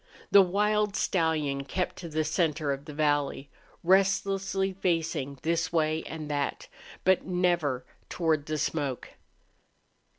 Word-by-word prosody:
The 200 - +9
wild 210 +2 +1
stallion 155 -6 0
kept 180 +6 -3
to 170 - -7
the 155 0 0
center 155 -2 0
of 140 +1 -4
the 150 - -8
valley, 145 -2 0 0.3
restlessly 195 +1 +2
facing 165 -7 -1
this 170 +1 0
way 155 -1 +1
and 155 -1 -6
that, 145 -1 -2 0.4
but 190 -1 +3
never 175 -8 +1 0.2
toward 160 -4 0
the 155 0 -1
smoke. 145 -4 -2
160 Hz, 125 wpm, -28 LUFS, 145-185 Hz, 0.4 s, The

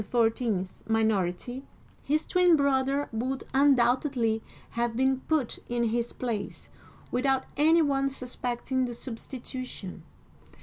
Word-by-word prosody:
*s 225 -5 0
minority, 220 +2 0 0.4
his 305 +2 0
twin 360 -2 +5
brother 280 0 +1
would 255 +4 -2
undoubtedly 250 -3 +3 0.3
have 235 -1 -1
been 265 +1 +2
put 305 -7 0
in 240 0 0
his 235 +1 -1
place, 230 -5 -4 0.4
without 265 +1 +2
any 320 +3 +5
one 275 -2 +1
suspecting 255 0 -2
the 240 -1 -5
substitution. 250 -5 -6
255 Hz, 105 wpm, -28 LUFS, 230-275 Hz, 0.4 s, twin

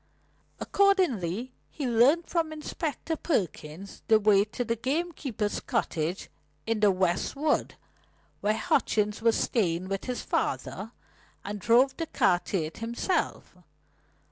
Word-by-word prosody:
Accordingly 255 - +1 0.2
he 290 - -5
learnt 255 +8 +4
from 330 -2 0
Inspector 310 0 -4
Perkins 190 - -3
the 220 -1 +6
way 205 -1 +5
to 220 +3 -4
the 230 +1 0
gamekeeper's 265 -5 -2
cottage 165 +3 -2 0.4
in 225 -1 0
the 210 -1 +5
West 185 +2 0
Wood, 295 +2 0 0.6
where 215 +1 +1
Hutchings 210 -1 +1
was 230 0 +3
staying 185 -5 0
with 195 -1 -3
his 250 -1 -3
father, - - -2 0.5
and 205 +1 -4
drove 245 +7 +4
the 330 - -3
car 180 -10 +3
to 195 - -1
it 155 +1 -7
himself. 235 - -2
225 Hz, 125 wpm, -28 LUFS, 195-285 Hz, 0.6 s, the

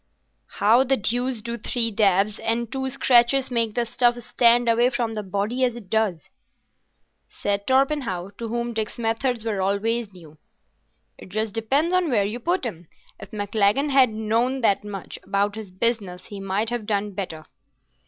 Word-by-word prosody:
"How 230 +5 +4
the 270 0 +2
deuce 245 +2 0
do 235 0 -3
three 230 +1 -1
dabs 200 0 +2
and 230 +1 -1
two 265 0 -2
scratches 260 0 +3
make 230 -3 0
the 240 - +1
stuff 240 +1 +2
stand 240 0 +3
away 235 +2 +4
from 240 -2 -2
the 215 - -3
body 205 +6 -2
as 245 -2 +1
it 210 -6 -11
does?" 210 -8 0 1.0
said 200 0 -3
Torpenhow, 260 -9 +1
to 230 - -4
whom 235 +1 -3
Dick's 220 -1 -3
methods 230 +1 -1
were 210 -4 -1
always 205 +3 0
new. 160 -5 -16 0.8
"It - - -12
just 215 +1 -2
depends 275 +10 +1
on 365 -3 +2
where 210 -6 +2
you 215 +4 -4
put 345 +4 -1
'em. 175 -7 -6 0.3
If - - -10
Maclagan 210 +6 +1
had 265 -2 +5
known 225 +4 0
that 205 -3 +2
much 200 -3 -7
about 200 +1 0
his 215 -3 -8
business 185 -3 -1
he 205 - -8
might 195 +4 -1
have 240 -3 -3
done 205 -1 -1
better." 180 -5 -6
225 Hz, 170 wpm, -23 LUFS, 200-245 Hz, 1.0 s, had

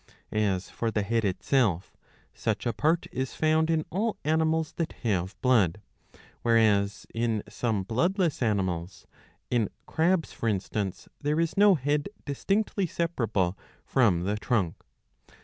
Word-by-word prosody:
As 100 -4 0
for 115 - -1
the 105 -2 0
head 115 +2 0
itself, 100 -1 +1 0.4
such - - -2
a 120 - 0
part 160 +2 +1
is 130 +1 -3
found 160 0 +2
in 160 -1 +1
all 215 +5 -1
animals 160 0 +1
that 165 - -2
have 95 -4 -1
blood; 105 -9 +3 0.6
whereas 105 -3 +3
in 115 -2 0
some 110 -5 -1
bloodless 170 - 0
animals, 95 -6 -1 0.5
in 115 -5 +2 0.2
crabs 165 +1 +1
for 115 - -1
instance, 100 -1 -2
there 150 +2 0
is 165 0 0
no 205 -1 +6
head 145 +3 0 0.2
distinctly 195 +6 0
separable 115 - 0 0.3
from 100 -10 +3
the 100 +3 -1
trunk. 105 -7 0
120 Hz, 130 wpm, -28 LUFS, 100-160 Hz, 0.6 s, no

